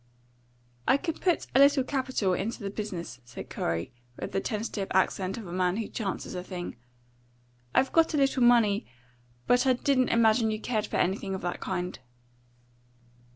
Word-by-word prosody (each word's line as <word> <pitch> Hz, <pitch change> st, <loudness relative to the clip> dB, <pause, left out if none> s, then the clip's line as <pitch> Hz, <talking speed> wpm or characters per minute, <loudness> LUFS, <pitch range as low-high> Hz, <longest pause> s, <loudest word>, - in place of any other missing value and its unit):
"I -, -, +5 dB
could 325 Hz, +1 st, -4 dB
put 355 Hz, -3 st, +1 dB
a 265 Hz, -, +5 dB
little 280 Hz, -1 st, +6 dB
capital 260 Hz, -8 st, 0 dB
into 210 Hz, +4 st, -3 dB
the 195 Hz, -, -3 dB
business," 185 Hz, -, -5 dB
said 120 Hz, 0 st, -10 dB
Corey, 85 Hz, +8 st, -2 dB, 0.2 s
with -, -, -5 dB
the -, -, 0 dB
tentative 210 Hz, -2 st, -3 dB
accent 190 Hz, 0 st, +1 dB
of 225 Hz, -, -7 dB
a 175 Hz, -, -8 dB
man 180 Hz, +1 st, +1 dB
who 225 Hz, -, -2 dB
chances 200 Hz, -5 st, -4 dB
a 180 Hz, -1 st, -4 dB
thing. 180 Hz, -2 st, -6 dB, 1.0 s
"I've 265 Hz, 0 st, +3 dB
got 330 Hz, -1 st, +4 dB
a -, -, +2 dB
little 275 Hz, -2 st, +2 dB
money, 230 Hz, -4 st, +4 dB, 0.6 s
but 245 Hz, +2 st, +3 dB
I 260 Hz, -, +6 dB
didn't 255 Hz, 0 st, +2 dB
imagine 225 Hz, 0 st, +4 dB
you 215 Hz, 0 st, -2 dB
cared 220 Hz, -2 st, -1 dB
for -, -, -2 dB
anything 190 Hz, +1 st, 0 dB
of 190 Hz, -, -5 dB
that 175 Hz, 0 st, -3 dB
kind." 180 Hz, -1 st, -3 dB
215 Hz, 170 wpm, -28 LUFS, 185-255 Hz, 1.0 s, little